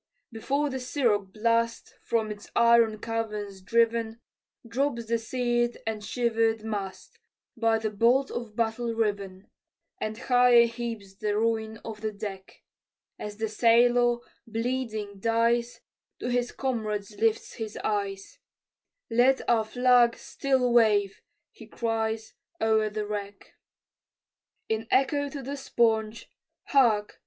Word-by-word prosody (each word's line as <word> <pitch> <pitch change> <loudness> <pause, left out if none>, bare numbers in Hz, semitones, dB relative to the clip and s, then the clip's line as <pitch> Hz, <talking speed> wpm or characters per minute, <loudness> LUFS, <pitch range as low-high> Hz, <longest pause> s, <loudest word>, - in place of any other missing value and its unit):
Before 280 +6 -1
the 260 - -3
siroc 235 -7 0
blast 230 +2 0
From 220 -2 -1
its 210 0 -9
iron 235 -2 +5
caverns 210 -3 -4
driven, 230 +2 +1 0.5
Drops 235 0 -1
the 230 +1 0
sear'd 240 0 0
and 220 -1 -3
shiver'd 225 -1 0
mast, 195 -4 -6 0.4
By 225 -1 +2
the 220 -1 -3
bolt 240 +6 +3
of 230 -3 -6
battle 230 +1 -1
riven, 200 -3 -2 0.5
And 215 0 -3
higher 245 -1 +5
heaps 230 -4 -5
the 205 +1 -2
ruin 220 0 0
of 220 -2 -7
the 215 0 -2
deck 200 -2 -8 0.6
As 210 -1 -6
the 220 0 -1
sailor, 240 +2 +4 0.3
bleeding, 225 -3 -3
dies, 235 +2 +1 0.4
To 245 - -3
his 245 0 0
comrades 215 -6 -3
lifts 225 0 +1
his 220 -2 -5
eyes, 200 - -3 0.7
"Let 250 +3 +3
our 230 -2 +3
flag 245 0 +4
still 260 -3 0
wave," 210 -4 +3 0.3
he 225 - -14
cries, 225 -1 -2 0.3
O'er 220 -1 +2
the 210 0 -3
wreck. 205 -1 -6 1.1
In 220 0 -2
echo 285 +2 +2
to 280 -1 -7
the 275 +3 -4
sponge, 225 -4 0 0.4
Hark! 225 -7 +3
225 Hz, 125 wpm, -27 LUFS, 215-240 Hz, 1.1 s, iron